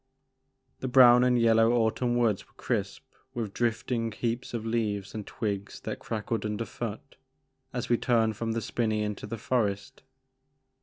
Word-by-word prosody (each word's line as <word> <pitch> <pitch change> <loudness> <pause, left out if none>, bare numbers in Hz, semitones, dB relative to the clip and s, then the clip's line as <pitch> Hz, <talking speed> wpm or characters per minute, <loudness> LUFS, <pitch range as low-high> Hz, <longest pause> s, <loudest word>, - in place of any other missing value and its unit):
The 130 - -3
brown 125 -1 +7
and 125 -1 +3
yellow 115 0 +4
autumn 120 +1 +1
woods 115 -5 +1
were - - -30
crisp - - -2 0.3
with 110 -4 -3
drifting 115 0 -1
heaps 115 +3 -3
of 115 -2 -4
leaves 105 -4 -1
and 110 -2 -6
twigs 100 -4 -4
that - - -5
crackled 110 0 -3
under 105 +1 -2
foot - - -7 0.5
as - - -3
we 120 - +3
turned 115 -3 +2
from 115 +2 -2
the 115 - -1
spinney 110 -2 -1
into 105 -1 -4
the 115 - -5
forest. 105 -4 -1
115 Hz, 155 wpm, -28 LUFS, 105-120 Hz, 0.5 s, brown